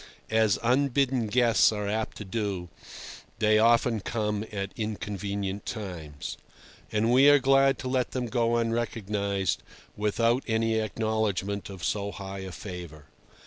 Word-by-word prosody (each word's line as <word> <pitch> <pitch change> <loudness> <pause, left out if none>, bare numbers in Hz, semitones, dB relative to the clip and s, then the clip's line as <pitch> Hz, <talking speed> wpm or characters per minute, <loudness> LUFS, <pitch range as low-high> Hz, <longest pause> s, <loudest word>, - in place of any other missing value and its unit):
As 110 -2 +3
unbidden 130 -1 +2
guests 115 0 +4
are 105 -1 -3
apt 110 +2 -2
to 105 - -7
do, 95 -4 -3 0.7
they 110 0 +4
often 115 0 +4
come 105 0 -2
at 100 -2 -4
inconvenient 100 -2 -4
times. 80 -9 -6 0.5
And 110 +2 +2
we 135 +3 +7
are 145 - +8
glad 135 0 +4
to 130 - -5
let 130 -1 0
them 125 -1 -2
go 120 0 +1
unrecognised, 105 -5 -1 0.3
without 115 +4 +1
any 110 -1 +1
acknowledgment 110 -2 -1
of 95 -3 -9
so 100 -1 -1
high 95 -1 -7
a 95 -1 -6
favour. 85 -4 -8
110 Hz, 135 wpm, -27 LUFS, 100-115 Hz, 0.7 s, are